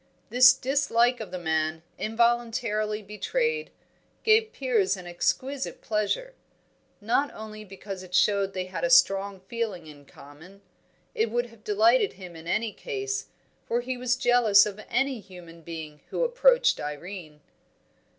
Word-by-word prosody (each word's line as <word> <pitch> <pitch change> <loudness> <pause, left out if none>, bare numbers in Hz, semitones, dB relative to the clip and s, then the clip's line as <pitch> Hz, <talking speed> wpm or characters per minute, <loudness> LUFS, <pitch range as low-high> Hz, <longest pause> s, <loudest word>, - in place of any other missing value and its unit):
This 250 +1 +8
dislike 255 -2 +1
of 215 -4 -6
the 185 - -5
man, 160 -1 -1 0.2
involuntarily 225 -2 0
betrayed, 465 - -2 0.5
gave 445 0 +4
Piers 220 - +1
an 180 - -10
exquisite 260 +10 -2
pleasure. 220 - -2 0.7
Not 240 +7 0
only 215 0 -8
because 195 -1 -8
it 180 -1 -7
showed 195 +1 +2
they 185 -1 -3
had 185 - -6
a - - +2
strong 195 - +4
feeling 200 -4 -4
in 145 -2 -14
common; 160 +10 -15 0.5
it 225 +1 0
would 240 +2 0
have 225 -2 -19
delighted 225 - +3
him 180 -3 -11
in 165 0 -11
any 220 +4 -1
case, 410 -4 -4 0.4
for 240 +1 0
he 255 +1 -4
was 250 0 0
jealous 245 -5 +5
of 210 0 -6
any 265 0 0
human 175 -4 -13
being 160 -2 -8
who - - -1
approached - - +3
Irene. 150 +1 -7
215 Hz, 140 wpm, -26 LUFS, 185-250 Hz, 0.7 s, This